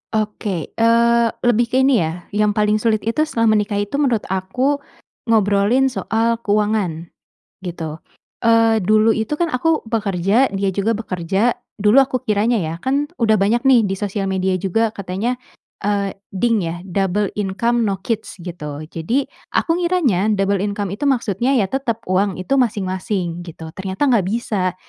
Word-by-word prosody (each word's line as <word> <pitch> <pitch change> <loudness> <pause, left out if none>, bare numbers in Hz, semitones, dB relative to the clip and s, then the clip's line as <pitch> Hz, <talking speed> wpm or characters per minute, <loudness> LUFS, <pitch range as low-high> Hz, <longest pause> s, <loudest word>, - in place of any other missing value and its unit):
Oke. 210 -5 -2
Eee 235 +1 +4 0.2
lebih 240 -1 +3
ke 260 +3 +2
ini 265 -3 +4
ya, 165 +1 -3
yang 210 0 +1
paling 210 0 +2
sulit 215 -1 +1
itu 305 +8 0
setelah 230 -7 +2
menikah 210 -1 +1
itu 205 +7 -1
menurut 250 -7 +1
aku 250 +10 0 0.5
ngobrolin 220 +4 +3
soal 230 -1 0
keuangan, 205 -6 -1 0.5
gitu. 165 -4 -5 0.5
Eee, 225 -2 +4
dulu 215 +3 +4
itu 225 +7 -2
kan 345 - +2
aku 315 +3 +1
bekerja, 205 +2 +1
dia 195 0 0
juga 200 +3 +1
bekerja. 200 +1 0 0.2
Dulu 210 +3 +3
aku 260 -1 -2
kiranya 215 +2 +2
ya, 160 -2 -3
kan 280 +3 0
udah 220 - +2
banyak 220 +5 +2
nih 245 -6 +5
di 195 - -2
sosial 195 0 -3
media 190 -1 0
juga 215 +4 0
katanya, 205 +5 -3 0.4
eee, 200 -1 0 0.2
DINK 230 +3 +2
ya, 170 -2 -3
Double 195 +1 -1
Income 220 +4 0
No 195 -1 -3
Kids, 220 +1 -3
gitu. 150 -4 -6
Jadi, 230 - 0 0.3
aku 330 +1 +1
ngiranya 320 - +1
double 195 0 +1
income 205 -1 -2
itu 220 +9 -2
maksudnya 245 0 +1
ya 200 -7 +1
tetap 235 -4 -2
uang 190 0 +1
itu 265 +9 0
masing-masing, 190 -5 -1
gitu. 160 -1 -9
Ternyata 190 - -4
enggak 205 -7 +2
bisa. 195 -4 -1
210 Hz, 155 wpm, -19 LUFS, 190-235 Hz, 0.5 s, nih